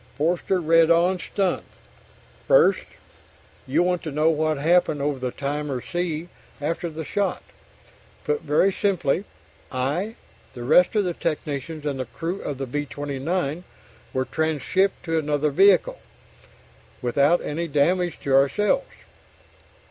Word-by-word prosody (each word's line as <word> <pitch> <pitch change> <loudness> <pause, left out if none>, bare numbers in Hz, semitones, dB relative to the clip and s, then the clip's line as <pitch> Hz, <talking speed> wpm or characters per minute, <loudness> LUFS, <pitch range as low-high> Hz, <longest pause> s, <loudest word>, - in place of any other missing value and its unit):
Forster 175 +4 +1
read 165 0 +4
on, 175 +2 +3
stunned: 190 -1 -1 0.9
First, - - +4 0.8
you'll 175 - +2
want 180 -1 0
to 155 - -5
know 155 +3 +3
what 155 -1 0
happened 160 0 +2
over 140 -1 -1
the 125 0 -2
Timor 140 0 -3
Sea 175 +2 -3 0.3
after 165 +3 -2
the 160 0 -6
shot. 195 +4 -2 0.8
Put 150 0 -1
very 160 +6 +2
simply, 185 -3 0 0.5
I, 150 - -2 0.4
the 120 - -6
rest 180 - +4
of 210 - +3
the 180 -2 -1
technicians, 155 -1 -4
and 140 -2 -2
the 130 - -2
crew 170 - -5
of 145 - -4
the 135 - -3
B 145 +3 -3
29 145 +4 -3 0.5
were 130 0 -1
transhipped 160 +6 0
to 165 -1 0
another 150 -1 0
vehicle 200 - +4 1.0
without 140 +7 +3
any 165 +3 -3
damage 170 +4 +1
to 135 - -1
ourselves. 210 - +2
160 Hz, 135 wpm, -24 LUFS, 145-180 Hz, 1.0 s, read